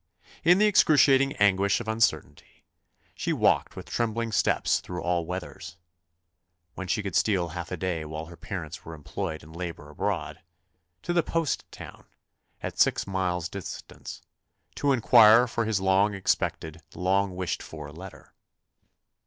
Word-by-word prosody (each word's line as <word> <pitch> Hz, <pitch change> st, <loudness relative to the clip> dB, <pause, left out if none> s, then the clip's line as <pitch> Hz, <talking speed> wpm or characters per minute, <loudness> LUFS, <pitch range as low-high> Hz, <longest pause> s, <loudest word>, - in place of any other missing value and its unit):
In 175 Hz, +3 st, +6 dB
the 210 Hz, -, +4 dB
excruciating 140 Hz, -8 st, +5 dB
anguish 100 Hz, 0 st, +2 dB
of 120 Hz, -, -7 dB
uncertainty, 110 Hz, +1 st, -1 dB, 0.5 s
she -, -, -3 dB
walked -, -, +2 dB
with -, -, -9 dB
trembling 115 Hz, 0 st, -2 dB
steps -, -, +2 dB
through 90 Hz, -1 st, -7 dB
all 85 Hz, -2 st, 0 dB
weathers 90 Hz, -1 st, -7 dB, 1.0 s
(when 95 Hz, -, -6 dB
she 105 Hz, +4 st, -1 dB
could 100 Hz, -4 st, -4 dB
steal 95 Hz, -5 st, +2 dB
half 85 Hz, +1 st, -7 dB
a 90 Hz, -, -3 dB
day 85 Hz, -2 st, -2 dB
while 80 Hz, +1 st, -6 dB
her 85 Hz, +1 st, -12 dB
parents 85 Hz, -5 st, -7 dB
were 80 Hz, -, -8 dB
employed 80 Hz, +2 st, -5 dB
in 80 Hz, +1 st, -14 dB
labour 85 Hz, -4 st, -7 dB
abroad) 75 Hz, -, -3 dB, 0.6 s
to 175 Hz, -, -2 dB
the 175 Hz, -, +3 dB
post 165 Hz, -2 st, -2 dB
town, -, -, -11 dB, 0.6 s
at -, -, -5 dB
six -, -, +3 dB
miles' 90 Hz, -3 st, -1 dB
distance, 95 Hz, +1 st, -8 dB, 0.5 s
to 145 Hz, -, 0 dB
inquire 115 Hz, -2 st, +7 dB
for 115 Hz, -1 st, -2 dB
his 110 Hz, -3 st, 0 dB
long 95 Hz, +2 st, +2 dB
expected, 80 Hz, -4 st, -2 dB
long 95 Hz, +1 st, 0 dB
wished 90 Hz, -2 st, -3 dB
for 75 Hz, -2 st, -9 dB
letter. 90 Hz, +5 st, -12 dB
95 Hz, 145 wpm, -27 LUFS, 85-110 Hz, 1.0 s, inquire